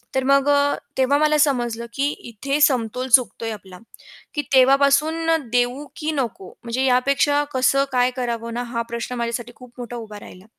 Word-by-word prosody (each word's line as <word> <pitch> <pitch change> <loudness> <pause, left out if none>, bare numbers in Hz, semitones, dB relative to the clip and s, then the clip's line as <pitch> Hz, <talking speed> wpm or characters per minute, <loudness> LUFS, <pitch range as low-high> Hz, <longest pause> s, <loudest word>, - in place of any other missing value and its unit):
तर 265 - +1
मग 275 +1 +3
अ, 285 0 +3 0.2
तेव्हा 265 +2 +3
मला 305 0 +3
समजलं 240 -5 0
की 280 +1 0 0.2
इथे 275 +6 -3
समतोल 250 -2 +1
चुकतोय 230 -2 +2
आपला, 190 -4 -10 0.6
की 295 - 0
तेव्हापासून 280 +5 +4 0.3
देऊ 245 +4 0
की 310 0 -2
नको, 235 -9 -4
म्हणजे 245 +3 -1
यापेक्षा 280 +3 +2
कसं 275 +2 +2
काय 250 0 +2
करावं 235 -2 -3
ना, 245 +1 -3
हा 235 -1 -4
प्रश्न 235 +1 -4
माझ्यासाठी 235 0 -4
खूप 250 -2 -15
मोठा 245 0 -7
उभा 215 -3 -9
राहिला. 185 -1 -14
250 Hz, 165 wpm, -21 LUFS, 235-280 Hz, 0.6 s, तेव्हापासून